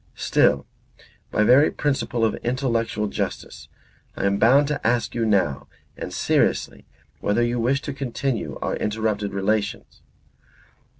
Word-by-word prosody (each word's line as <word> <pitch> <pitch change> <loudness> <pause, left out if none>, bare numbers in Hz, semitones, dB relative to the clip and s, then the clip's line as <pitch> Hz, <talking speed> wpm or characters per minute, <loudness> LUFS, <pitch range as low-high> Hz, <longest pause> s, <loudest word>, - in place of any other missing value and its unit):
Still, 70 - +2 0.6
by - - 0
every 130 +7 +6
principle 130 -5 -1
of 110 - +1
intellectual 115 -3 -1
justice, 100 - -5 0.5
I - - -1
am 100 0 +1
bound 135 +5 +5
to 150 - -2
ask 115 -3 0
you 115 -1 0
now 70 -10 +1 0.3
and - - -6
seriously - - 0 0.3
whether 105 +9 +1
you 120 0 0
wish 135 +5 +1
to 145 - -4
continue 130 - -3
our - - -1
interrupted 105 -1 -1
relations." 100 +1 -2
115 Hz, 130 wpm, -23 LUFS, 105-125 Hz, 0.6 s, every